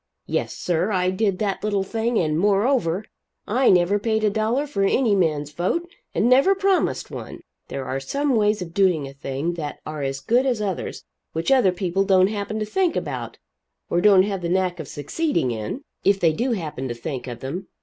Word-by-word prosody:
Yes, - - -2
sir, 175 +4 0
I 185 -2 +1
did 195 0 0
that 200 -2 -2
little 205 -2 +1
thing. 225 +3 -1
And 155 -3 +1
moreover, 200 -1 +2 0.4
I 250 +5 +3
never 185 +3 +4
paid 220 0 0
a 210 - +3
dollar 225 +7 0
for 280 -9 -3
any 220 +3 +3
man's 150 -5 0
vote 185 - -1 0.3
and - - +2
never 275 +10 +5
promised 390 -1 +1
one. - - -7 0.3
There 135 -1 -5
are 135 - -2
some 275 - 0
ways 210 -2 +2
of 165 -1 -11
doing 180 -7 +2
a 135 - -10
thing 140 +4 -3
that 155 -4 -5
are 155 -1 -5
as 135 0 -2
good 245 - +2
as 245 -4 +1
others 195 -4 -3 0.3
which 165 +10 -1
other 255 -9 +5
people 180 +1 0
don't 190 -1 +4
happen 210 0 -3
to 215 - -1
think 360 - 0
about, - - -4 0.5
or 175 - +2
don't 195 -1 +6
have 195 -2 -2
the 170 - -2
knack 180 -1 0
of 155 - -6
succeeding 160 - -1
in, 115 - -4 0.2
if 200 0 +3
they 165 -3 +3
do 240 +8 0
happen 150 - -4
to 120 - -4
think 130 +2 -5
of 120 -2 -7
them. 155 +9 -5
195 Hz, 200 wpm, -23 LUFS, 165-220 Hz, 0.5 s, don't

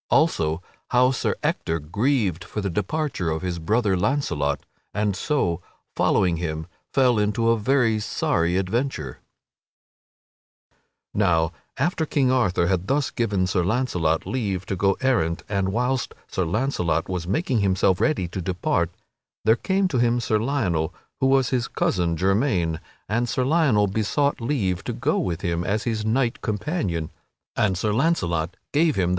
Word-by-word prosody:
Also 80 - +2 0.3
How 125 +1 +4
Sir 130 - -1
Ector 80 - 0
Grieved 95 - 0
for 100 - -5
the 100 -2 -2
Departure 105 - -1
of 80 +2 -2
His 90 -2 -2
Brother 105 +4 +1
Launcelot 90 - 0 0.3
and 105 -2 +1
So, 95 - 0 0.3
Following 90 -3 +2
Him, 80 -2 -3 0.3
Fell 125 -4 +3
into 105 +2 +1
a 115 - +4
Very 115 -1 +2
Sorry 85 -4 0
Adventure_. 95 - -1 2.0
Now 85 -5 +2 0.3
after 165 -2 0
King 135 -4 +2
Arthur 100 -9 +2
had 95 +1 0
thus 140 +3 +1
given 100 -6 0
Sir 90 -1 +1
Launcelot 90 -7 0
leave 100 -8 -2
to 95 - -2
go 95 +1 +2
errant 90 -11 +1
and 100 -2 0
whilst 125 +5 -1
Sir 95 - -1
Launcelot 90 - 0
was 90 -2 -3
making 125 - +1
himself 95 -2 +2
ready 150 - +1
to 95 - -4
depart 85 -1 0 0.6
there 110 +1 +6
came 190 +8 +1
to 130 - 0
him 120 0 +3
Sir 110 -2 +1
Lionel, 100 - 0 0.3
who 135 - +3
was 135 -2 +3
his 125 -2 0
cousin 85 -2 0
germain, 95 - +1 0.3
and 115 +4 0
Sir 130 - 0
Lionel 135 -9 +3
besought 110 +8 0
leave 110 -8 -1
to - - -2
go - - 0
with 85 -1 -2
him 85 0 -1
as 105 +4 -1
his 110 -3 -1
knight 115 +2 0
companion, 105 - -2 0.4
and 95 -3 +1
Sir 105 +3 0
Launcelot 95 - 0 0.2
gave 155 +1 +3
him - - +1
that - - +2
leave. 85 - +1
105 Hz, 155 wpm, -24 LUFS, 90-125 Hz, 2.0 s, there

